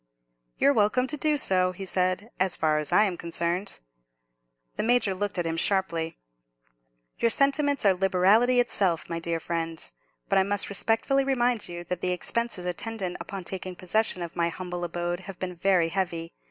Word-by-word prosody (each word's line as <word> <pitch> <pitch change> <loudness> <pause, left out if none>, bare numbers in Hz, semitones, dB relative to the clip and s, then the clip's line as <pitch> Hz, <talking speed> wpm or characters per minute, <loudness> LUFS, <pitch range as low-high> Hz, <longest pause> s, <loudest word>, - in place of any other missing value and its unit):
"You're 280 - +4
welcome 220 +3 +2
to 270 +3 -3
do 300 0 +1
so," 185 -7 +3
he 195 +2 -7
said, 185 +4 -1
"as 185 -1 +3
far 155 -1 +1
as 150 - -3
I 210 - +6
am 190 -5 -1
concerned." 170 - -3 0.9
The - - -1
Major 225 -3 +2
looked 200 +1 -3
at 175 - -1
him 165 0 -2
sharply. 170 -4 0 1.0
"Your 230 - +3
sentiments 280 +1 +2
are 195 - +6
liberality 195 +7 +3
itself, 190 -8 +2
my 165 - -2
dear 165 0 -2
friend. 165 -1 -2 0.4
But 195 - +3
I - - +4
must 205 +1 +1
respectfully 225 +7 +1
remind 245 -5 0
you 175 0 -6
that 180 0 -4
the 180 0 0
expenses 230 0 -2
attendant 185 +1 -3
upon 195 -2 -6
taking 185 0 -6
possession 185 0 -1
of 170 - -8
my 170 0 +1
humble 175 0 -5
abode 175 0 -2
have 190 -1 -9
been 180 -1 -5
very 175 -2 +2
heavy. 170 -2 -3
185 Hz, 175 wpm, -26 LUFS, 175-220 Hz, 1.0 s, I